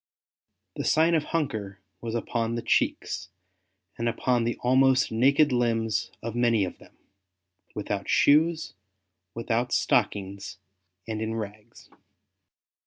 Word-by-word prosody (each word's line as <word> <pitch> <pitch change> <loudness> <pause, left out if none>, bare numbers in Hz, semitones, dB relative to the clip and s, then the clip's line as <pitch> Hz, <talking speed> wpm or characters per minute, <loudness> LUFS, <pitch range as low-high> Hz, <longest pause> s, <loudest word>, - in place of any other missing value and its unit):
the - - -2
sign 160 +2 +3
of 155 -2 +1
hunger 110 - -3 0.2
was 115 -1 -4
upon 115 0 -2
the 115 - -4
cheeks 90 0 0 0.7
and 115 0 +1
upon 120 0 0
the 120 - -1
almost 130 +1 +4
naked 140 +6 +4
limbs 115 -3 0
of 115 -1 -4
many 115 -4 +2
of 90 - -8
them, - - -19 0.8
without 100 -1 -4
shoes, 160 +3 +3 0.6
without 115 +1 -1
stockings, 95 -2 0 0.5
and 110 -1 -3
in 110 0 -2
rags. 105 -1 -8
115 Hz, 115 wpm, -26 LUFS, 105-130 Hz, 0.8 s, almost